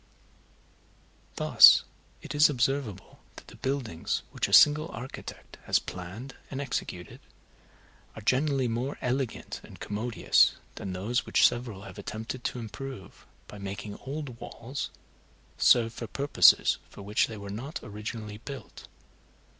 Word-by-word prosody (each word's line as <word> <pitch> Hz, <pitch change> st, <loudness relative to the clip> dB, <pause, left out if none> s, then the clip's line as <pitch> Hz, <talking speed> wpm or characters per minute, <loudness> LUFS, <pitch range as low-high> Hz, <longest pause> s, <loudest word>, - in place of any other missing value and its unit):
Thus -, -, +8 dB, 0.4 s
it -, -, -6 dB
is 150 Hz, +1 st, +6 dB
observable 130 Hz, -6 st, -2 dB, 0.2 s
that -, -, -12 dB
the -, -, -13 dB
buildings 130 Hz, -11 st, -2 dB
which -, -, -1 dB
a -, -, -8 dB
single 155 Hz, +2 st, +7 dB
architect 125 Hz, +3 st, -9 dB
has -, -, +3 dB
planned 95 Hz, +9 st, -7 dB, 0.2 s
and 135 Hz, -, -5 dB
executed, 95 Hz, -10 st, -4 dB, 1.0 s
are 110 Hz, -, -8 dB
generally 135 Hz, +2 st, +2 dB
more 120 Hz, +5 st, -2 dB
elegant 125 Hz, -1 st, -3 dB
and -, -, -13 dB
commodious 110 Hz, +3 st, +2 dB, 0.2 s
than 95 Hz, -, -6 dB
those 105 Hz, +7 st, -1 dB
which -, -, +6 dB
several 120 Hz, -5 st, -5 dB
have 105 Hz, -, -10 dB
attempted 110 Hz, +4 st, -6 dB
to -, -, -2 dB
improve, 120 Hz, -2 st, -8 dB, 0.2 s
by 105 Hz, -, -10 dB
making 100 Hz, +1 st, -6 dB
old 135 Hz, -3 st, -6 dB
walls 130 Hz, +4 st, -6 dB, 0.7 s
serve 115 Hz, -2 st, +5 dB
for 115 Hz, -, -6 dB
purposes 140 Hz, +7 st, +4 dB
for 100 Hz, -, -11 dB
which 105 Hz, +2 st, +1 dB
they 110 Hz, -, -8 dB
were 100 Hz, -1 st, -7 dB
not 125 Hz, +9 st, -5 dB
originally 105 Hz, 0 st, -6 dB
built. 135 Hz, +4 st, -9 dB
120 Hz, 130 wpm, -28 LUFS, 105-135 Hz, 1.0 s, Thus